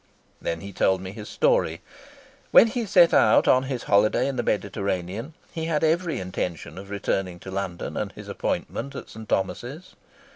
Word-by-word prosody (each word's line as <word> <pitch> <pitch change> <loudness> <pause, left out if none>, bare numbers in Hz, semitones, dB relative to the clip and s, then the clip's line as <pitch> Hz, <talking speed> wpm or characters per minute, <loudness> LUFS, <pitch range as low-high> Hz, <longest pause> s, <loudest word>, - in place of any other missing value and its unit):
Then 85 -1 -3
he 100 +2 -8
told 95 +1 +2
me 95 0 -7
his 105 0 -9
story. - - +2 0.7
When - - +8
he 230 0 -2
set 180 -3 +6
out 110 - +5
on 130 +1 +5
his 130 -3 -3
holiday 105 +5 +3
in 140 - -2
the 120 - 0
Mediterranean 100 - -2 0.2
he 160 -1 -3
had 160 -2 0
every 165 -3 +1
intention 90 -1 -4
of 100 0 -10
returning 95 -3 -2
to 95 - -8
London 95 -3 -4
and - - -2
his - - -10
appointment 140 - -3
at - - -7
St. 110 -1 -10
Thomas's. 125 - -2
110 Hz, 175 wpm, -25 LUFS, 95-155 Hz, 0.7 s, When